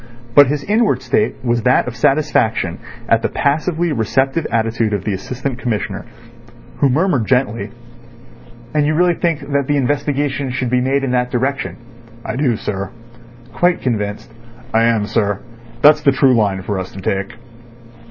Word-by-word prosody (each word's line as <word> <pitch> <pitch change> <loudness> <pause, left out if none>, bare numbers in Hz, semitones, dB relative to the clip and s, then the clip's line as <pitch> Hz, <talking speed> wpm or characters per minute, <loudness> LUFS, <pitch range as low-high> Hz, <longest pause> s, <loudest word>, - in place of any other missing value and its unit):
But 145 +1 +8
his 145 +1 -2
inward 215 +4 +1
state 215 - +1
was 120 -1 +1
that 125 +2 +3
of 125 - -5
satisfaction 115 - +1 0.3
at 115 0 +3
the - - 0
passively 160 +4 0
receptive 135 +5 0
attitude 115 -1 0
of 100 - -1
the 105 - -1
Assistant 125 +6 -4
Commissioner, 105 -5 -3 0.7
who 140 - +3
murmured 145 - +1
gently: 115 -5 0 1.0
"And 150 -1 +2
you 155 - +1
really 175 +1 +3
think 165 -3 -1
that 140 -1 +1
the 145 - +1
investigation 140 0 -1
should 125 -1 -2
be 125 0 +2
made 135 +2 +1
in 135 - -1
that 125 0 +1
direction?" 130 +3 -2 0.5
"I - - -3
do, 130 -5 +1
sir." 100 -2 -4 0.6
"Quite 175 +6 +1
convinced? 105 -3 -3 0.4
"I 115 +1 +4
am, 115 -3 +2
sir. 105 -2 0 0.4
That's 150 +1 +7
the 140 - +4
true 135 -1 +4
line 100 -5 +1
for 100 0 -2
us 95 - -6
to 95 - -8
take." 95 +2 -2
125 Hz, 160 wpm, -18 LUFS, 110-145 Hz, 1.0 s, But